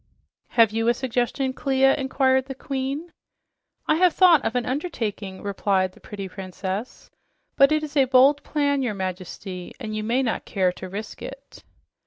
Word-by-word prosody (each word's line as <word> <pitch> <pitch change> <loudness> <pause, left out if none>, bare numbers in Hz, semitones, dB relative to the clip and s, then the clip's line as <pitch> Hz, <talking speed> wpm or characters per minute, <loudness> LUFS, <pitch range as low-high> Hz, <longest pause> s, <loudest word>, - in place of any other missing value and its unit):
"Have 225 -2 +6
you 225 +1 -1
a 240 - +4
suggestion, 260 +1 -1
Clia?" 270 0 +3
inquired 265 -1 +1
the 270 0 -7
Queen. 275 +5 -4 0.7
"I 310 - +2
have 360 -1 +4
thought 345 -6 +6
of 230 - -2
an 245 - 0
undertaking," 225 - -4
replied 195 -2 0
the - - -20
pretty 200 -2 -7
princess, 190 +3 -6 0.4
"but 275 +1 +6
it 310 0 +2
is 295 -1 -7
a 275 -2 +5
bold 265 +3 +5
plan, 285 -2 0
your 240 -5 -1
Majesty, 185 -1 -6
and 215 -4 -5
you 215 - -2
may 240 +5 +1
not 230 - -1
care 185 -3 +1
to 185 +1 -9
risk 210 +3 -7
it." - - -10
250 Hz, 170 wpm, -24 LUFS, 200-275 Hz, 0.7 s, Have